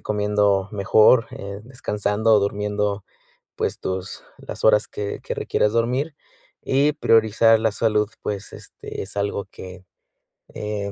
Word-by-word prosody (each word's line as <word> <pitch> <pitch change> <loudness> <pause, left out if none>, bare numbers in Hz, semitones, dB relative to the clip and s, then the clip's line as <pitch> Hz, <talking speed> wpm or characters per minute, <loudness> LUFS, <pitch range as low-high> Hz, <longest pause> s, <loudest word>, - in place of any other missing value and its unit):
comiendo 105 -2 +1
mejor, 110 +4 +4
eh, 100 +1 -7
descansando 110 -3 -1
o - - +6
durmiendo, 105 0 -1 0.5
pues - - -2
tus 95 0 -5 0.2
las - - -6
horas 105 -1 +4
que 100 -1 -5
que - - -3
requieras 105 - 0
dormir. 125 +7 0 0.5
Y 140 +3 +2
priorizar 115 -3 +4
la 110 -1 +1
salud 105 -1 +1
pues 105 0 -5
este - - -9
es 95 +1 -8
algo 100 0 -2
que, 95 -1 -11 0.7
eh, 105 -1 -4
105 Hz, 130 wpm, -22 LUFS, 100-110 Hz, 0.7 s, o